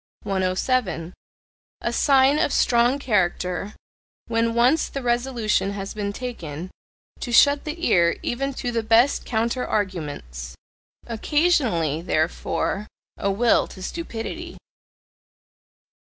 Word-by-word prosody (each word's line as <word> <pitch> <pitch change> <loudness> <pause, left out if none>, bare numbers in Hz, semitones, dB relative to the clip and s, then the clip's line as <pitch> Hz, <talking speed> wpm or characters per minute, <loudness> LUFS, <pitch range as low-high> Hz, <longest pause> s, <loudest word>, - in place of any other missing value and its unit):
107. 185 -1 -1 0.7
A - - -2
sign 275 +1 +4
of - - +1
strong 240 +2 +3
character, 195 -5 -1 0.5
when 230 0 0
once 250 +7 +3
the 275 - -5
resolution 240 -4 0
has 195 -1 -5
been 205 -1 -3
taken, 185 - -6 0.5
to 245 - -5
shut 285 +4 +5
the 330 +3 -4
ear 170 -1 +3
even 275 +3 -1
to 250 -2 -4
the 230 -1 0
best 230 +5 +3
counter 235 +2 -1
arguments. 145 - -4 0.5
Occasionally, 230 - +1
therefore, 175 +5 -1 0.3
a 200 - -1
will 225 +4 +3
to 185 - -11
stupidity. 335 - -6
230 Hz, 110 wpm, -23 LUFS, 185-255 Hz, 0.7 s, shut